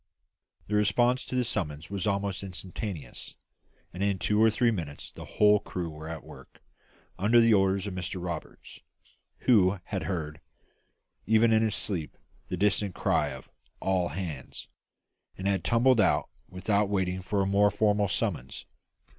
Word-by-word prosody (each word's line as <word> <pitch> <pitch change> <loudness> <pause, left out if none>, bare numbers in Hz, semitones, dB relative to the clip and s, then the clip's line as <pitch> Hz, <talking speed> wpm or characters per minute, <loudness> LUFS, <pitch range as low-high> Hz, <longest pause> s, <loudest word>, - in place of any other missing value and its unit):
The 105 - -6
response 120 +5 +3
to - - -5
this 125 -2 +1
summons 80 -7 -3
was 100 0 -2
almost 100 -1 -1
instantaneous, 95 - -6 0.6
and 90 - -6
in 100 -1 +1
two 105 +3 +1
or 110 - +6
three 115 +2 +2
minutes 80 -9 -5
the - - -10
whole 105 0 +4
crew 90 -4 -5
were 80 +1 -9
at 80 -1 -6
work, - - -15 0.6
under 110 +5 +5
the 115 -1 +5
orders 95 -1 +2
of 100 - -4
Mr 90 0 -4
Roberts, 85 -1 -7 0.6
who 100 -6 +4
had 95 0 -4
heard, 80 -4 -4 0.9
even 110 +1 +4
in 110 - +4
his 110 -2 +1
sleep, 85 -7 -3 0.3
the 90 - -3
distant 100 0 +1
cry 75 - +1
of 65 -1 -8 0.3
"All 95 -2 +1
hands," 80 -10 -6 0.7
and 95 - -3
had 95 -4 0
tumbled 120 0 +4
out - - +2 0.2
without 100 +2 0
waiting 95 -2 -1
for 100 +2 0
a - - 0
more 100 +1 +4
formal 105 0 +2
summons. 70 -6 -3
100 Hz, 155 wpm, -28 LUFS, 90-105 Hz, 0.9 s, or